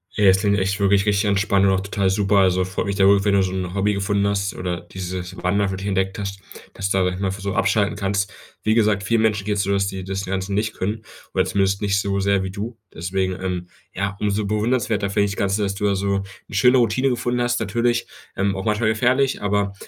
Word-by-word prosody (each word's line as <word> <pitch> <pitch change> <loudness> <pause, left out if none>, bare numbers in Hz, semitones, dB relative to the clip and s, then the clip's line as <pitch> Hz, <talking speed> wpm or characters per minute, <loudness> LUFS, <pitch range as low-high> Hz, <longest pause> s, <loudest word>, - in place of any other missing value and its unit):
Ja, 105 - +2
das 95 0 +6
klingt 100 0 +2
echt 95 +1 0
wirklich 100 0 +3
richtig 105 0 +2
entspannt 100 0 +2
und - - +4
auch 95 0 +1
total 100 0 0
super. 100 +1 +2
Also, 95 -1 +3
freut 95 +1 -3
mich 100 - -1
da 100 -1 +3
wirklich, 100 0 +5
wenn 100 - +3
du 95 - +4
so 95 - -2
'n 90 -1 -4
Hobby 100 +1 +1
gefunden 100 0 0
hast 100 -1 -1
oder 90 -1 -3
dieses 90 -1 -6
Wandern 100 +2 +1
für 95 - -3
dich 95 - -6
entdeckt 95 -1 -1
hast, 100 -1 -5 0.3
dass 100 0 -3
du 95 - +1
dadurch 90 +1 0
einfach 95 +1 -2
so 100 0 -2
abschalten 105 -2 +1
kannst. 100 0 -1 0.3
Wie 110 - +2
gesagt, 105 -3 +2
vielen 115 +2 +2
Menschen 105 -3 +1
geht's 105 -1 0
so, 100 - -1
dass 100 0 +2
die 95 -1 -4
das 95 +1 -4
Ganze 95 +1 -3
nicht 110 +2 0
können 105 +4 -3 0.3
oder - - +3
zumindest 100 -1 0
nicht 100 -1 +2
so 100 0 -1
sehr 100 0 +2
wie 95 - -3
du. 105 +5 -5 0.2
Deswegen, 95 +2 -2
ähm, 90 -1 -3 0.3
ja, 100 +1 -3
umso 105 0 0
bewundernswerter 105 -1 0
finde 100 0 +2
ich 100 - -2
das - - -10
Ganze, 100 0 +1
dass 100 -1 -1
du 105 - -2
da 100 -1 +2
so 100 +1 -2 0.4
'ne 105 - -8
schöne 125 +6 +5
Routine 125 +3 +2
gefunden 125 0 -1
hast. 120 0 +1
Natürlich, 115 +3 0 0.3
ähm, 100 0 0
auch 95 - -5
manchmal 110 +1 +1
gefährlich, 125 +4 +1
aber 100 -1 0
100 Hz, 240 wpm, -22 LUFS, 95-105 Hz, 0.4 s, das